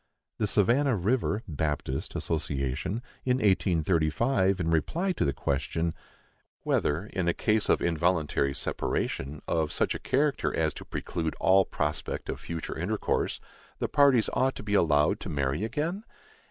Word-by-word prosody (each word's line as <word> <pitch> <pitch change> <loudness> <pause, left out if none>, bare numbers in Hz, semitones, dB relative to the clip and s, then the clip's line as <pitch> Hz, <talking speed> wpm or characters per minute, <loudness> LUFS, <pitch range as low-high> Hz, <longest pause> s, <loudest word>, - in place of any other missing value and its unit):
The 105 - +1
Savannah 120 +7 +3
River 110 +2 0
(Baptist) 75 -4 -3
Association, 75 - -2 0.2
in 125 0 +2
1835, 95 - +2
in 80 -2 0
reply 165 - +1
to 180 - -1
the 70 - +2
question, 75 +5 -1 0.7
Whether, 80 +7 +1
in 95 -4 -3
a 85 - +2
case 110 -1 +1
of - - +3
involuntary 80 -5 +1
separation, 70 +3 -2
of 80 -2 0
such - - +1
a - - -5
character 145 +1 0
as 80 -2 +1
to - - -9
preclude 80 -3 -3
all 95 0 +5
prospect 75 0 -3
of - - -3
future 85 -1 -5
intercourse, - - -1 0.4
the - - -1
parties 140 -6 +4
ought 130 0 +1
to - - -7
be 105 -1 -3
allowed 75 -6 +3
to - - -6
marry 70 +4 -1
again? 160 - -2
85 Hz, 145 wpm, -28 LUFS, 75-110 Hz, 0.7 s, all